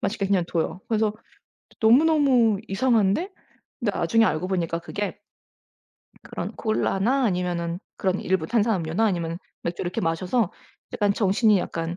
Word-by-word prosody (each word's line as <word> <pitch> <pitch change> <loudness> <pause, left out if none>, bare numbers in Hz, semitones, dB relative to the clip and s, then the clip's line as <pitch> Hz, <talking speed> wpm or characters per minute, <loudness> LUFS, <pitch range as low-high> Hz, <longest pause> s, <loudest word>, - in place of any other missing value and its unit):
마시게 200 0 -1
그냥 190 -3 +2
둬요. 170 +2 -2
그래서 215 -2 +1 0.7
너무 230 +6 +6
너무 260 -10 +3
이상한데 225 - +1 0.5
근데 215 -5 -1
나중에 225 +7 +3
알고 180 -2 -1
보니까 170 -3 -1
그게 205 +3 -4 1.1
그런 - - -6
콜라나 225 +4 +1
아니면은 175 -3 -1 0.2
그런 190 0 0
일부 185 -4 0
탄산음료나 210 -4 +1
아니면 170 -5 -1 0.2
맥주 170 +1 -3
이렇게 175 0 -3
마셔서 180 +6 0 0.4
약간 205 -4 +2
정신이 205 +1 +3
약간 165 -1 -4
195 Hz, 330 characters per minute, -24 LUFS, 175-225 Hz, 1.1 s, 너무